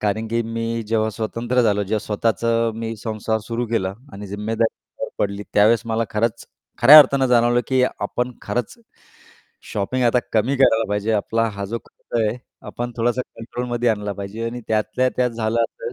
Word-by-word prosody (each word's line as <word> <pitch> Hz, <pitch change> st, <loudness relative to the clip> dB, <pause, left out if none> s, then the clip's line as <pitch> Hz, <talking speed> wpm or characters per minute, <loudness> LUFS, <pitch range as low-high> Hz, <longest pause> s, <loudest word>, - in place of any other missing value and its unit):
कारण 110 Hz, +2 st, -1 dB
की 115 Hz, +1 st, 0 dB
मी 115 Hz, 0 st, -3 dB
जेव्हा 110 Hz, 0 st, +1 dB
स्वतंत्र 115 Hz, +3 st, -1 dB
झालो 105 Hz, -3 st, +2 dB
जेव्हा 105 Hz, +3 st, -1 dB
स्वतःचं 115 Hz, +2 st, +1 dB
मी 115 Hz, 0 st, -4 dB
संसार 110 Hz, 0 st, -2 dB
सुरू 115 Hz, +2 st, -3 dB
केला 95 Hz, -5 st, -1 dB, 0.2 s
आणि 100 Hz, +1 st, -8 dB
जिम्मेदारीं 110 Hz, +3 st, -1 dB, 0.2 s
अंगावर -, -, -6 dB
पडली 100 Hz, 0 st, -1 dB
त्यावेळेस 110 Hz, +3 st, +5 dB
मला 115 Hz, 0 st, 0 dB
खरंच 115 Hz, +2 st, -1 dB, 0.3 s
खऱ्या 140 Hz, +6 st, +10 dB
अर्थानं 140 Hz, -2 st, +5 dB
जाणवलं, 120 Hz, 0 st, +3 dB
की 130 Hz, -1 st, +2 dB, 0.2 s
आपण 125 Hz, +1 st, -2 dB
खरंच 125 Hz, -2 st, -3 dB, 1.0 s
शॉपिंग 125 Hz, +6 st, -1 dB
आता 120 Hz, +1 st, +4 dB
कमी 115 Hz, +5 st, +2 dB
करायला 115 Hz, -4 st, +4 dB
पाहिजे. 105 Hz, +2 st, 0 dB
आपला 115 Hz, +2 st, +1 dB
हा 100 Hz, -1 st, -5 dB
जो 115 Hz, +4 st, -3 dB
खर्च 120 Hz, -, -5 dB
आहे 110 Hz, +1 st, 0 dB, 0.3 s
आपण 120 Hz, 0 st, -4 dB
थोडासा 120 Hz, +2 st, +1 dB, 0.2 s
कंट्रोलमध्ये 120 Hz, +1 st, -2 dB
आणला 105 Hz, -2 st, -1 dB
पाहिजे 100 Hz, +3 st, -6 dB
आणि 120 Hz, +1 st, -5 dB
त्यातल्या 110 Hz, +4 st, +1 dB
त्यात 125 Hz, -1 st, +2 dB
झालं 115 Hz, 0 st, -1 dB
असं, 470 Hz, -, -5 dB
115 Hz, 170 wpm, -21 LUFS, 110-120 Hz, 1.0 s, खऱ्या